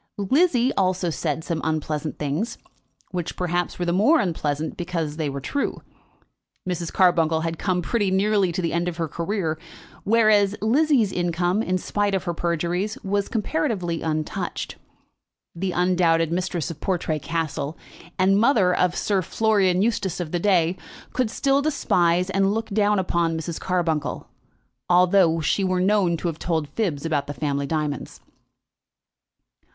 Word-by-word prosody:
Lizzie 260 - +2
also 185 -2 0
said 155 -1 -2
some 165 -1 -3
unpleasant 155 -1 -2
things, 155 +11 -2 0.5
which, 175 -3 -4
perhaps, 175 -1 -1
were 175 - -2
the 170 - 0
more 275 - +4
unpleasant 155 -4 -2
because 165 -4 -3
they 155 -3 -1
were 140 0 -4
true. 280 - -3 0.8
Mrs. 175 -2 -3
Carbuncle 165 -4 +3
had 165 0 -3
come 180 -2 0
pretty 205 +1 0
nearly 195 -1 +2
to 180 +2 -3
the 165 - -1
end 170 +1 0
of 170 -2 -3
her 165 -1 -1
career, 170 0 -2 0.4
whereas 210 -2 +4
Lizzie's 250 -1 +3
income, 175 +3 0
in 185 -4 0
spite 205 +2 -1
of 190 - -1
her 175 -2 -2
perjuries, 175 +5 -1
was 200 +1 0
comparatively 180 -5 -1
untouched. 155 -1 -3 0.8
The 185 +2 -2
undoubted 175 -2 +2
mistress 175 -2 -2
of 155 - -11
Portray 170 -4 -1
Castle, 155 0 -3 0.4
and 195 +1 +4
mother 215 -7 +4
of 180 -1 +2
the - - -6
Sir 200 -2 +1
Florian 195 -1 +2
Eustace 200 -6 -1
of 170 -3 -4
the 175 - 0
day, 180 -2 +2 0.4
could 255 -3 0
still 275 +4 +1
despise 180 - +1
and 195 +1 +2
look 225 0 -3
down 210 0 +2
upon 170 -3 0
Mrs. 160 0 -5
Carbuncle, 165 -5 -1 0.6
although 180 -2 +4
she 195 +6 +1
were 185 -1 +1
known 185 -3 +2
to 175 - -3
have 165 -2 -4
told 160 -4 -1
fibs 160 -4 -2
about 145 -3 0
the 145 - -5
family 140 -2 -2
diamonds. 150 -3 -3
180 Hz, 155 wpm, -23 LUFS, 165-200 Hz, 0.8 s, more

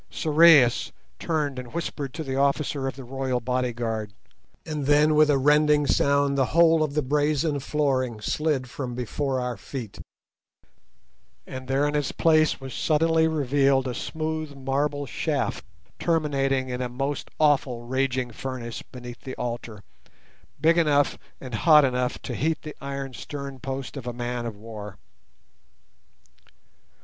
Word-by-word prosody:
Sorais 150 -7 +5 0.3
turned 150 -5 -1
and 125 +3 -9
whispered 150 -5 -3
to 160 - -4
the 135 -2 -3
officer 140 0 0
of 135 - -4
the 135 - -9
royal 130 0 -2
bodyguard, 120 -4 -2 0.5
and 150 -3 -3
then 150 +1 +5
with 150 0 +5
a 145 - +4
rending 150 +1 +4
sound 140 0 +2
the 135 -1 +3
whole 165 -1 +6
of 150 -2 -1
the 150 - +1
brazen 150 +2 +1
flooring 130 -5 0
slid 140 +3 -1
from 125 -1 -5
before 130 +2 -2
our 125 -1 -2
feet, 110 +1 -8 1.5
and 130 0 -8
there 135 +2 +2
in 145 - -2
its 145 -3 0
place 155 -1 +3
was 135 -1 -8
suddenly 160 +1 +2
revealed 140 -3 +2
a 125 - -2
smooth 155 +2 -4
marble 140 +2 -1
shaft 130 - -2 0.4
terminating 135 -5 0
in 125 0 -3
a 125 - -2
most 135 +3 -3
awful 140 -5 +2
raging 130 -1 -1
furnace 120 -1 -6
beneath 125 -1 -10
the 130 - -7
altar, 120 -3 -5 0.8
big 165 +3 +4
enough 145 -3 +3 0.2
and 130 -2 -9
hot 150 +6 +6
enough 125 -1 -1
to - - -4
heat 160 +2 -1
the 155 -1 -7
iron 140 -1 -5
stern 140 +1 -7
post 135 +1 -5
of 130 -3 -7
a 120 - -3
man 120 0 -3
of 110 - -6
war. 105 -2 -9
135 Hz, 145 wpm, -25 LUFS, 125-150 Hz, 1.5 s, whole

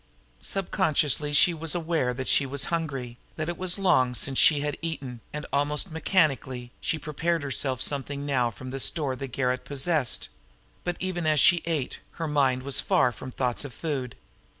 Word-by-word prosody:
Subconsciously 155 -6 +1
she 160 +4 +5
was 165 +1 -3
aware 160 -7 0
that 130 +1 -5
she - - +4
was 135 0 -3
hungry, 135 -7 -3 0.2
that 155 +1 -3
it 175 - -2
was 185 +1 +2
long 130 -11 +3
since 135 +2 0
she 145 -2 +6
had 145 0 -1
eaten, 140 -7 -4
and, 150 0 -5
almost 145 +5 +2
mechanically, 135 - 0
she 160 - 0
prepared 160 +2 -1
herself 130 -1 -1
something 140 0 -2
now 130 -4 +1
from 125 +4 -9
the 135 - -4
store 140 -1 +1
the 135 +1 -5
garret 125 0 -1
possessed; 140 0 0 0.6
but, 175 -1 -2
even 180 -3 -2
as 155 -1 +4
she 175 +4 +6
ate, 155 -6 -1
her 165 - -4
mind 135 -4 +2
was 140 0 0
far 125 - +3
from 130 - -9
thoughts 125 0 -1
of 140 -4 -8
food. 135 -7 -3
145 Hz, 175 wpm, -27 LUFS, 130-160 Hz, 0.6 s, she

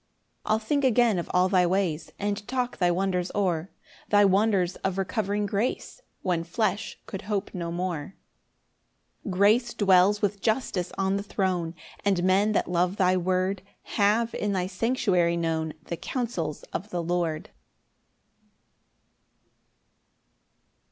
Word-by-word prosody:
9 - - +2
I'll - - +3
think 280 +6 0
again 240 -6 +3
of 170 - -5
all 180 +1 +3
thy 185 -1 +3
ways, 170 -4 -1
And 205 0 -3
talk 250 -1 -2
thy 180 -2 +3
wonders 180 0 0
o'er; 180 -3 0 0.4
Thy 205 -1 +5
wonders 195 -2 +2
of 190 -1 -2
recovering 200 +2 -1
grace, 210 - -2 0.2
When 175 -3 0
flesh 210 +4 -2
could 195 - -6
hope 205 -1 -2
no 170 -3 -4
more. 175 -1 -3 1.1
10 195 - -4
Grace 215 +5 +3
dwells 195 0 +4
with 205 -1 -1
justice 215 -6 -1
on 195 0 +1
the - - -2
throne; 185 -4 -1 0.3
And 195 -3 +1
men 195 +3 +3
that - - +1
love 180 +1 +1
thy 185 -2 +3
word 185 +1 0 0.3
Have 220 +3 +2
in 205 -1 -1
thy 185 -2 0
sanctuary 185 -4 +1
known 160 -2 -1
The 170 - -5
counsels 185 - -3
of 205 +5 -4
the 175 -3 -2
Lord. 170 -2 -2
190 Hz, 140 wpm, -26 LUFS, 180-205 Hz, 1.1 s, Thy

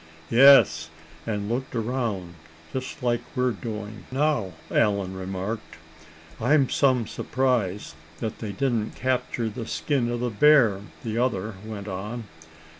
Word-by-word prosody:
"Yes, 115 - +7 0.4
and 105 -2 -2
looked 125 +3 -3
around, 110 -7 -2 0.4
just 130 -1 -5
like 120 -1 +1
we're 125 -1 +2
doing 105 +1 -6
now," 135 - +1 0.2
Allan 100 -4 +2
remarked. 95 +4 -5 0.6
"I'm 135 +3 +3
some 130 -4 +3
surprised 115 -6 -1 0.2
that 110 -2 -4
they 110 -3 -4
didn't 115 -1 -1
capture 125 -2 -1
the 110 +1 -5
skin 135 -5 0
of 120 0 -2
the 125 -1 -1
bear," 115 -5 +5 0.2
the 115 0 -2
other 110 -4 0
went 105 -2 -7
on. 105 +5 -5
115 Hz, 125 wpm, -25 LUFS, 105-125 Hz, 0.6 s, Yes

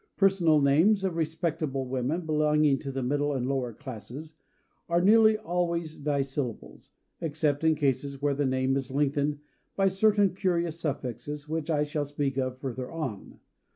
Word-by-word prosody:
Personal 185 -6 +4
names 165 +9 +4
of 185 -3 -1
respectable 160 -4 -2
women, 130 +6 -1
belonging 150 -2 +2
to 135 - -5
the 135 -1 -3
middle 145 +3 0
and 130 -3 -1
lower 130 -3 -1
classes, 130 +5 -9 0.6
are 170 0 +3
nearly 220 +3 +5
always 170 -5 -2
dissyllables 140 -4 -3 0.3
except 150 -2 -1
in 160 -1 +4
cases 140 -1 -1
where 145 0 +1
the 140 0 0
name 130 +1 +1
is 135 -1 -2
lengthened 145 +1 0 0.4
by 195 -1 +3
certain 200 0 +3
curious 170 -3 -1
suffixes 145 0 -4
which 160 +1 -3
I 150 -2 +2
shall 145 0 -2
speak 140 -2 -2
of 130 -1 -2
further 130 -1 -5
on. 140 -12 -6
150 Hz, 155 wpm, -28 LUFS, 135-165 Hz, 0.6 s, nearly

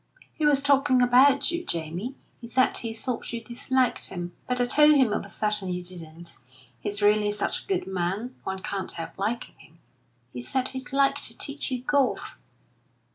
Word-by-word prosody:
"He 310 -2 +1
was 280 -2 +3
talking 280 -2 +4
about 265 +5 +5
you, 340 0 -2
Jamie. 170 - -4 0.2
He 235 - -9
said 255 +2 +2
he 230 - -2
thought 230 +2 -4
you 235 - -3
disliked 250 +2 0
him; 175 -1 -5
but 250 0 0
I 245 - +3
told 300 +4 +6
him 255 -7 +4
I - - +2
was - - -10
certain 210 -3 -1
you 180 0 -3
didn't. 170 -1 -10 0.4
He's 205 - -2
really 210 0 +4
such 205 0 -1
a - - -25
good 385 -2 0
man, 190 +6 -2
one 190 0 -4
can't 195 -1 -3
help 165 -1 -6
liking 220 +4 -3
him. 165 - -19 0.6
He 125 - -5
said 260 - -1
he'd 260 -1 -7
like 275 0 +3
to - - -3
teach 280 0 -4
you 250 -2 -3
golf." 280 -1 0
235 Hz, 185 wpm, -26 LUFS, 190-265 Hz, 0.6 s, told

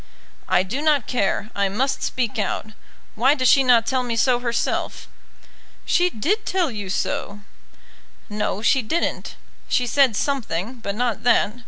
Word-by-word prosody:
"I 180 - +3
do 240 +10 -4
not 300 -5 +2
care; 215 -2 -1
I 200 -1 0
must 255 +8 -1
speak 240 -4 -2
out. 210 +2 -3 0.4
Why 260 +6 +3
does 255 -3 +1
she 275 - +6
not 240 -3 +4
tell 260 +1 0
me 240 -2 -3
so 245 +1 +2
herself?" 235 -1 -2 0.8
"She 355 0 +2
did 360 - -1
tell 360 -6 0
you 205 -4 -6
so." 200 +2 -3 0.9
"No, 210 -1 -3
she 265 +3 +3
didn't. 320 +10 -2 0.3
She 250 - +1
said 260 -2 +3
something, 240 - -2
but 200 -3 -4
not 240 0 -1
that. 220 -3 +3
245 Hz, 155 wpm, -22 LUFS, 210-270 Hz, 0.9 s, she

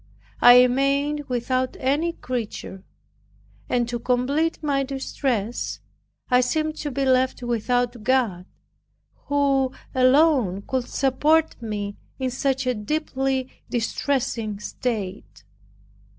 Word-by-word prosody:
I 245 +1 +9
remained 280 +3 +1
without 255 +1 -1
any 295 +6 +1
creature; 225 - -5 0.9
and 240 -1 +1
to 240 0 -3
complete 265 +7 0
my 280 -2 +1
distress, 260 -4 -2 0.5
I 250 -1 +4
seemed 310 +5 -1
to 295 - -3
be 275 0 -1
left 255 -1 +2
without 240 0 0
God, 215 -7 +1 0.8
who 275 -2 +2 0.2
alone 255 - +3
could 255 +1 -2
support 295 +3 +1
me 205 -2 -4 0.2
in 260 -1 -2
such 265 +1 -1
a 250 - +1
deeply 265 +2 -1 0.2
distressing 230 -3 -1
state. 210 -3 -5
255 Hz, 105 wpm, -24 LUFS, 240-275 Hz, 0.9 s, I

